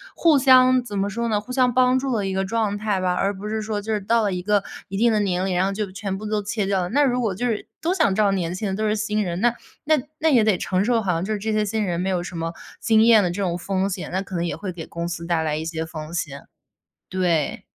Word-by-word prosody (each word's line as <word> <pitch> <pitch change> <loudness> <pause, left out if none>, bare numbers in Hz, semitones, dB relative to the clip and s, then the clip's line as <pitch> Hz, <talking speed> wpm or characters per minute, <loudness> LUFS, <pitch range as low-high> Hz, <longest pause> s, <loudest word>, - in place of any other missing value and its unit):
互 320 -4 +4
相 255 -1 +6
怎 210 -4 -6
么 195 +1 +1
说 235 +3 -2
呢， 215 -2 +1
互 215 +5 -10
相 250 -1 +3
帮 255 +1 +3
助 270 0 -2
的 205 -3 -1
一 190 - -2
个 190 0 0
状 210 0 -1
态 205 -2 -1
吧， 185 -1 +1
而 195 +2 0
不 200 +2 -7
是 220 +1 -2
说 215 -1 -3
就 220 +1 -2
是 210 - -1
到 225 +3 +2
了 200 -2 0
一 180 - -3
个 205 +1 +1 0.2
一 195 - -5
定 235 +3 +4
的 215 - +2
年 185 -2 0
龄， 190 -2 -1
然 180 +2 +2
后 - - -1
就 200 -1 -3
全 195 0 -4
部 215 - -8
都 210 0 -1
切 205 0 -2
掉 195 -1 +1
了。 175 - -3
那 285 +8 +3
如 250 -2 +1
果 215 -6 -1
就 240 +6 -2
是 225 -4 -2
都 340 +3 0
想 200 - +2
找 205 -1 +3
年 180 -2 -1
轻 210 +3 -3
的 190 - -2
都 215 +2 -1
是 210 - +1
新 215 0 -1
人， 175 -2 -3
那 240 0 +3 0.3
那 310 0 +3 0.2
那 320 - +3
也 245 -7 +5
得 210 -4 +3
承 185 +2 0
受， 235 +1 +2
好 190 - +1
像 165 0 -1
就 215 - -3
是 - - -1
这 215 +2 -2
些 215 0 +2
新 210 +1 -1
人 175 -2 -1
没 190 - -1
有 180 -2 0
什 180 - -8
么 165 0 -3 0.3
经 220 -1 +4
验 225 -2 +7
的 180 - +1
这 180 +4 -3
种 175 -2 -1
风 190 +1 -1
险， 185 -2 -5
那 190 +1 -1
可 195 - -12
能 170 - 0
也 170 - -2
会 195 -3 -5
给 170 -3 -8
公 170 0 -4
司 170 -1 -5
带 170 -2 +1
来 155 -1 -1
一 155 - -3
些 160 -1 -3
风 155 -1 -8
险。 140 -5 -4 0.6
对。 175 -5 0
200 Hz, 325 characters per minute, -23 LUFS, 180-220 Hz, 0.6 s, 验